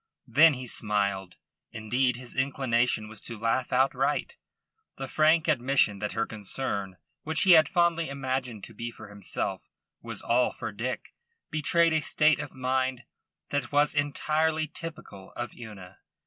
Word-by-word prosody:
Then 145 Hz, +6 st, +6 dB
he 130 Hz, 0 st, -7 dB
smiled. 100 Hz, -5 st, 0 dB, 0.3 s
Indeed 120 Hz, +3 st, 0 dB
his 125 Hz, -1 st, -9 dB
inclination 125 Hz, -4 st, 0 dB
was 110 Hz, -1 st, -8 dB
to 115 Hz, -, -6 dB
laugh 115 Hz, +3 st, 0 dB
outright. 135 Hz, -, +1 dB, 0.6 s
The 135 Hz, -, -5 dB
frank 155 Hz, +3 st, +3 dB
admission 130 Hz, -7 st, +2 dB
that 105 Hz, 0 st, -3 dB
her 115 Hz, -, 0 dB
concern 100 Hz, -3 st, -4 dB, 0.2 s
which 160 Hz, 0 st, +2 dB
he 190 Hz, -, +5 dB
had 160 Hz, -2 st, +7 dB
fondly 170 Hz, -3 st, +2 dB
imagined 130 Hz, -5 st, -3 dB
to -, -, -8 dB
be 120 Hz, 0 st, -5 dB
for 110 Hz, -2 st, -12 dB
himself 100 Hz, -2 st, -3 dB, 0.4 s
was -, -, -7 dB
all 125 Hz, +1 st, +2 dB
for -, -, -5 dB
Dick 120 Hz, +5 st, -5 dB, 0.4 s
betrayed 165 Hz, +2 st, +2 dB
a 155 Hz, -, +2 dB
state 155 Hz, +1 st, +3 dB
of 145 Hz, -2 st, -5 dB
mind 130 Hz, -1 st, -1 dB, 0.5 s
that 145 Hz, -4 st, -2 dB
was 145 Hz, +1 st, +3 dB
entirely 155 Hz, +2 st, 0 dB
typical 155 Hz, -, -9 dB
of 120 Hz, 0 st, -5 dB
Una. 100 Hz, -5 st, -11 dB
130 Hz, 150 wpm, -28 LUFS, 110-150 Hz, 0.6 s, had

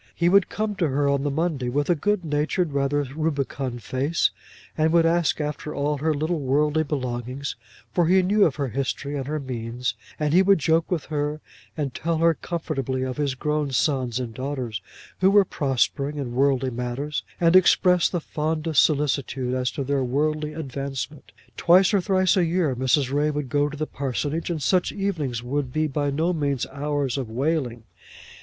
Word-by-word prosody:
He 170 Hz, +1 st, +2 dB
would 195 Hz, +1 st, +4 dB
come 215 Hz, 0 st, -2 dB
to 170 Hz, -, +2 dB
her 140 Hz, +1 st, +1 dB
on 140 Hz, -1 st, +2 dB
the 145 Hz, -, 0 dB
Monday 145 Hz, -4 st, -1 dB
with 145 Hz, +3 st, 0 dB
a 175 Hz, -, +4 dB
good 185 Hz, +3 st, 0 dB
natured, 150 Hz, +2 st, 0 dB
rather 140 Hz, +1 st, +1 dB
rubicund 140 Hz, -6 st, -2 dB
face, 140 Hz, +6 st, +1 dB, 0.4 s
and 160 Hz, 0 st, +2 dB
would 165 Hz, 0 st, +4 dB
ask 165 Hz, -1 st, +2 dB
after 150 Hz, 0 st, -4 dB
all 145 Hz, 0 st, -1 dB
her 160 Hz, +3 st, +1 dB
little 155 Hz, +3 st, -1 dB
worldly 150 Hz, +3 st, +2 dB
belongings, 130 Hz, -2 st, -3 dB, 0.4 s
for 175 Hz, -2 st, +2 dB
he 185 Hz, +2 st, +4 dB
knew 205 Hz, +3 st, +3 dB
of 150 Hz, -8 st, +3 dB
her 140 Hz, -1 st, -2 dB
history 140 Hz, +3 st, -3 dB
and 135 Hz, -2 st, -3 dB
her 155 Hz, +1 st, -2 dB
means, 125 Hz, -2 st, -3 dB, 0.3 s
and 150 Hz, -1 st, 0 dB
he 180 Hz, -, +6 dB
would 195 Hz, 0 st, +5 dB
joke 160 Hz, +2 st, +1 dB
with 175 Hz, -4 st, -1 dB
her, 150 Hz, +1 st, -1 dB, 0.4 s
and 140 Hz, -4 st, -2 dB
tell 165 Hz, +3 st, -1 dB
her 165 Hz, +1 st, +4 dB
comfortably 135 Hz, -6 st, -3 dB
of 130 Hz, -1 st, -4 dB
his 140 Hz, -3 st, 0 dB
grown 150 Hz, +2 st, -1 dB
sons 130 Hz, -2 st, 0 dB
and 120 Hz, -3 st, -4 dB
daughters, 130 Hz, -5 st, -4 dB, 0.4 s
who 190 Hz, -, +5 dB
were 200 Hz, 0 st, +5 dB
prospering 140 Hz, 0 st, 0 dB
in 130 Hz, -4 st, -4 dB
worldly 135 Hz, 0 st, +2 dB
matters, 125 Hz, +5 st, -3 dB, 0.2 s
and 170 Hz, +1 st, +4 dB
express 180 Hz, -1 st, +5 dB
the 175 Hz, -, -1 dB
fondest 155 Hz, -1 st, +1 dB
solicitude 135 Hz, -4 st, 0 dB
as 130 Hz, -1 st, 0 dB
to 140 Hz, -, -4 dB
their 140 Hz, 0 st, 0 dB
worldly 150 Hz, +4 st, -1 dB
advancement. 140 Hz, -1 st, -5 dB, 0.3 s
Twice 185 Hz, +4 st, +5 dB
or 200 Hz, -, +4 dB
thrice 185 Hz, -1 st, +2 dB
a 185 Hz, -, +3 dB
year 165 Hz, -5 st, +1 dB
Mrs. 130 Hz, +1 st, +1 dB
Ray 145 Hz, +1 st, +2 dB
would 145 Hz, -3 st, -3 dB
go 145 Hz, +1 st, +1 dB
to 150 Hz, -, -8 dB
the 155 Hz, -, -1 dB
parsonage, 145 Hz, +4 st, -3 dB
and 160 Hz, -4 st, -2 dB
such 180 Hz, +5 st, +2 dB
evenings 155 Hz, -, -2 dB
would 130 Hz, +1 st, -2 dB
be 155 Hz, +4 st, +1 dB
by 145 Hz, -1 st, -1 dB
no 160 Hz, +6 st, 0 dB
means 140 Hz, -6 st, -1 dB
hours 140 Hz, -1 st, -1 dB
of 125 Hz, -4 st, -4 dB
wailing. 125 Hz, -2 st, -1 dB
145 Hz, 185 wpm, -24 LUFS, 135-160 Hz, 0.4 s, he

